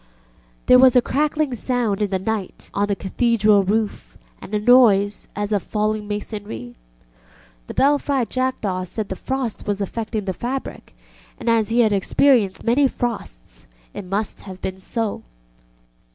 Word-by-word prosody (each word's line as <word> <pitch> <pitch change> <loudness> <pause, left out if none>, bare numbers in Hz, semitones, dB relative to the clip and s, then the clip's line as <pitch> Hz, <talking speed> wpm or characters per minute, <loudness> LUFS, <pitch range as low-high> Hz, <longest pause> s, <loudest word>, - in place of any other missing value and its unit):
There 250 - +7
was 260 -1 +6
a 250 - +7
crackling 300 0 0
sound 235 -4 -1
in 205 - +1
the 190 - 0
night 200 0 -4
on 200 +1 0
the 200 - 0
Cathedral 210 +1 +2
roof 210 +2 -2 0.2
and - - -10
a 210 - 0
noise 210 -4 +4
as 205 +1 -3
of 205 -2 +1
falling 215 +1 -2
masonry. 205 - -6 0.9
The - - -8
belfry 280 -2 +2
jackdaw 220 -8 -2
said 210 +3 -5
the 190 - -3
frost 260 -1 -4
was 205 -1 -1
affecting 215 +1 -3
the 190 - -2
fabric, 260 +7 -6 0.4
and - - -9
as 225 -2 +2
he 235 +2 +3
had 215 -3 +3
experienced 205 0 +2
many 260 +4 +3
frosts - - -5 0.3
it - - -7
must 200 +3 -3
have 190 -2 -10
been 190 0 -5
so. 220 +2 -3
215 Hz, 150 wpm, -21 LUFS, 200-245 Hz, 0.9 s, There